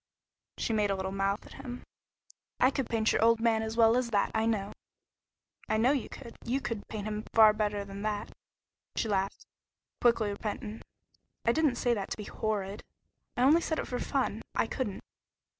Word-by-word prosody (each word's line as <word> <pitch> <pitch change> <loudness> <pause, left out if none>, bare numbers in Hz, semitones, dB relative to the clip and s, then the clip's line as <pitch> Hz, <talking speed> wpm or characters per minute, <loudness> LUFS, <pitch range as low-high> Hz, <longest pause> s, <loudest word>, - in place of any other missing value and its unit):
She 230 - -1
made 210 -2 +2
a 195 - +1
little 190 0 -3
mouth 195 +1 -1
at - - -12
him. 245 0 -7 0.8
"I 255 - +5
could 265 -3 -2
paint 225 -1 +2
your - - +2
old 230 0 +5
man 225 -1 +3
as 220 +1 -4
well 225 0 +6
as 250 -1 +1
that, 205 -3 +1
I 220 0 +1
know." 205 -3 0 1.0
"I 220 - +2
know 240 +4 +4
you 280 -4 -1
could. 235 -4 -10
You 255 +3 0
could 230 -6 -4
paint 210 -2 -5
him 215 0 -3
far 220 -1 +8
better 210 -1 -1
than 200 0 -7
that." 210 -1 -2 0.6
She - - 0
laughed, 195 -1 -1 0.6
quickly 230 -3 +3
repentant. 210 +1 -5 0.6
"I 235 - +5
didn't 300 -1 +2
say 240 0 +2
that 200 -4 -3
to - - -3
be 210 - -5
horrid. 205 -1 -3 0.5
I 245 - +3
only 305 +6 +6
said 315 -1 -1
it - - -2
for 250 - -3
fun. - - -1
I - - +3
couldn't." 210 -7 -3
220 Hz, 190 wpm, -30 LUFS, 205-235 Hz, 1.0 s, far